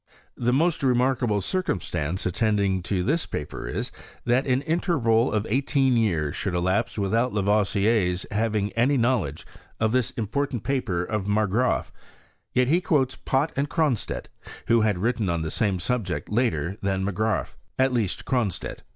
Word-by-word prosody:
The 120 0 0
most 160 +6 +2
remarkable 125 -4 +2
circumstance 90 - -2
attending 100 -1 +1
this 100 - 0
paper 75 -4 -5
is, - - -3 0.3
that 125 +3 +2
an 130 +1 +1
interval 145 -9 +2
of 105 -1 0
eighteen 135 +1 +2
years 85 -11 +1
should 95 -3 -2
elapse 95 +7 0
without 115 +5 +1
Lavoisier's 100 -2 +2
having 105 -1 0
any 125 +5 +2
knowledge 115 - 0 0.3
of 110 0 +2
this 125 -1 +1
important 120 +1 -2
paper 110 -11 -1
of 105 0 -3
Margraaf; 110 +4 +1 0.6
yet 125 0 +2
he 170 +6 +3
quotes 135 -7 +1
Pott 135 +4 0
and 140 +1 -1
Cronstedt, 150 -9 -1 0.4
who 115 0 +4
had 105 -3 +2
written 110 0 0
on 85 -2 -1
the 80 - -3
same 100 -4 +1
subject 100 -1 -2
later 95 - 0
than 95 -1 0
Margraaf, 105 +1 -1 0.2
at 130 0 +2
least 110 -6 -1
Cron 120 -6 +1
stedt. - - -7
110 Hz, 150 wpm, -25 LUFS, 95-130 Hz, 0.6 s, who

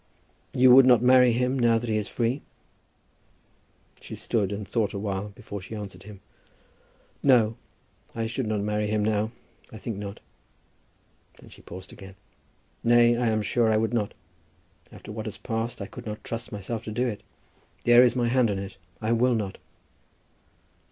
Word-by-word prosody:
"You 125 0 +7
would 130 0 +8
not 125 -2 +6
marry 125 -1 +6
him, 125 +3 0
now 115 -1 +4
that 120 +1 -4
he 110 - 0
is 105 -1 -1
free?" 120 +4 -1 1.6
She - - -8
stood 105 -4 -1
and 100 -1 -5
thought 110 +2 0
a - - -3
while 100 0 -3
before 100 0 -8
she 105 +4 -8
answered 100 -4 -8
him. 100 0 -12 1.0
"No, 115 -5 +4 0.6
I 115 -1 -1
should 115 +1 -3
not 105 -1 -1
marry 105 0 -1
him 105 0 0
now. 110 0 +1 0.4
I 110 - -9
think 110 0 -5
not." 100 0 -7 1.2
Then - - -16
she - - -15
paused 95 +2 -10
again. 95 -1 -12 0.7
"Nay, 120 0 +5
I 120 0 0
am 110 -1 0
sure 115 +2 +2
I 110 - +3
would 110 +2 0
not. 105 -4 -1 0.8
After - - -11
what 110 +1 -5
has 105 - -6
passed 115 +1 -3
I - - -5
could 125 +3 -10
not 105 0 -6
trust 115 +1 -5
myself 105 +2 -5
to 110 - -5
do 120 +4 0
it. 110 -5 -3 0.6
There 120 0 +7
is 125 -1 +4
my 120 -2 +1
hand 125 -1 +3
on 100 - -1
it. 95 0 -7 0.3
I 110 - 0
will 120 +1 +3
not." 105 -4 -3
110 Hz, 180 wpm, -26 LUFS, 105-120 Hz, 1.6 s, would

